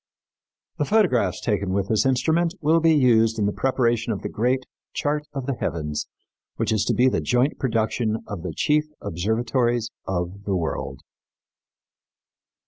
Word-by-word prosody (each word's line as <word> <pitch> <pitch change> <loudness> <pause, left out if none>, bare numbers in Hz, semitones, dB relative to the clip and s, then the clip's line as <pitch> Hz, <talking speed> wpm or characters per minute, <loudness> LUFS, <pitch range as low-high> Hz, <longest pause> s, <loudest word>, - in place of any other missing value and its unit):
The 145 - +2
photographs 130 - +2
taken 100 -4 -1
with 100 0 0
this 110 +3 +2
instrument 160 +7 +1
will 160 +1 +3
be 165 -1 +4
used 115 -5 +4
in 105 - +1
the 100 - +1
preparation 120 -3 +1
of 100 - -4
the - - -3
great 125 +3 0 0.3
chart 150 0 -1
of 135 -3 -5
the 140 - -1
heavens 75 -10 -3 0.5
which - - -1
is 110 -3 +2
to - - +1
be 125 - +4
the 130 - +1
joint 125 +4 +1
production 110 -2 0
of 100 -5 -5
the 90 0 -4
chief 150 - +1
observatories 115 +5 0 0.2
of 95 +2 -3
the 100 - 0
world. 70 -6 -3
115 Hz, 155 wpm, -24 LUFS, 100-135 Hz, 0.5 s, be